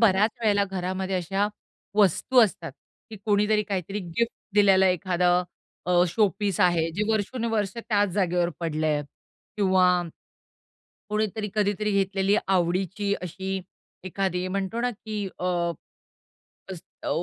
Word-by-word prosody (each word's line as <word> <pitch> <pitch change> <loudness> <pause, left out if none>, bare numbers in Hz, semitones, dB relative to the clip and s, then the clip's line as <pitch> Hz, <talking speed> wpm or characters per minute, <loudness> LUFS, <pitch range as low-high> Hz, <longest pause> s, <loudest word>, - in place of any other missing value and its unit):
बऱ्याच 210 -1 +4
वेळेला 205 -2 +3
घरामध्ये 190 0 -3
अशा 195 +3 0 0.5
वस्तू 215 - +4
असतात, 210 - -1 0.4
की 220 - -7
कोणीतरी 210 0 +2
काहीतरी 195 0 -3
गिफ्ट 205 +6 -2 0.2
दिलेलं 195 -2 +5
एखादं 180 0 +2 0.4
अ, 180 - +1 0.2
शोपीस 200 0 0
आहे, 165 -2 +2
जे 200 +6 -2
वर्षोनवर्ष 220 -1 -1
त्याच 210 -3 +1
जागेवर 180 -2 +1
पडलंय 155 -2 0 0.5
किंवा 190 -2 +3 1.3
कोणीतरी 210 0 -1
कधीतरी 210 0 +1
घेतलेली 195 0 +1
आवडीची 190 +2 0
अशी 190 +2 -4 0.4
एखादी 185 -1 -2
म्हणतो 195 +4 -2
ना, 245 - +1
की 210 -2 -5
अ, 180 - -3 1.3
अस 180 - -6 0.2
अ, - - -2
195 Hz, 115 wpm, -26 LUFS, 180-210 Hz, 1.3 s, दिलेलं